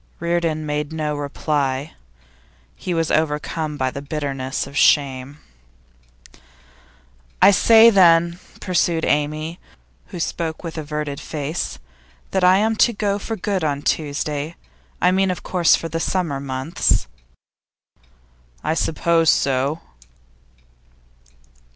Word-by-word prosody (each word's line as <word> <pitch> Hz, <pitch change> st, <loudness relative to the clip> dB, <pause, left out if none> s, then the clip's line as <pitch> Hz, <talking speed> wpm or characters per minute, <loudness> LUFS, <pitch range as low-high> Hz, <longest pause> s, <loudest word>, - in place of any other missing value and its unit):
Reardon 170 Hz, -2 st, -1 dB
made 150 Hz, 0 st, -3 dB
no 155 Hz, -2 st, -2 dB
reply. 145 Hz, -1 st, -2 dB, 0.8 s
He 185 Hz, -, -5 dB
was 165 Hz, -2 st, 0 dB
overcome 155 Hz, 0 st, -1 dB
by 130 Hz, -2 st, -1 dB
the 140 Hz, -, -6 dB
bitterness 140 Hz, -2 st, -3 dB
of 140 Hz, +1 st, -12 dB
shame. 140 Hz, -2 st, +2 dB, 2.0 s
'I -, -, +7 dB
shall -, -, +1 dB
say, 225 Hz, +4 st, +7 dB
then,' 170 Hz, -3 st, +4 dB, 0.2 s
pursued 170 Hz, -3 st, 0 dB
Amy, 155 Hz, +3 st, -1 dB, 0.5 s
who 180 Hz, -, -8 dB
spoke 165 Hz, 0 st, -3 dB
with 165 Hz, -2 st, -6 dB
averted 150 Hz, -1 st, -4 dB
face, 150 Hz, -, -4 dB, 0.5 s
'that 190 Hz, -1 st, 0 dB
I 180 Hz, +1 st, +6 dB
am 220 Hz, +2 st, +1 dB
to 235 Hz, -, +4 dB
go 205 Hz, -1 st, -1 dB
there 200 Hz, +1 st, 0 dB
for 225 Hz, +2 st, -4 dB
good 195 Hz, -3 st, -2 dB
on 145 Hz, -2 st, -1 dB
Tuesday? 150 Hz, +1 st, -2 dB, 0.4 s
I 180 Hz, -, +3 dB
mean, 190 Hz, +1 st, +2 dB
of 180 Hz, -, -4 dB
course, 175 Hz, -3 st, +3 dB
for 165 Hz, -, -4 dB
the 165 Hz, 0 st, -3 dB
summer 165 Hz, -5 st, -1 dB
months.' 135 Hz, +4 st, 0 dB, 1.6 s
'I 155 Hz, -, 0 dB
suppose 165 Hz, 0 st, +1 dB
so. 140 Hz, +4 st, +1 dB
155 Hz, 120 wpm, -21 LUFS, 145-175 Hz, 2.0 s, I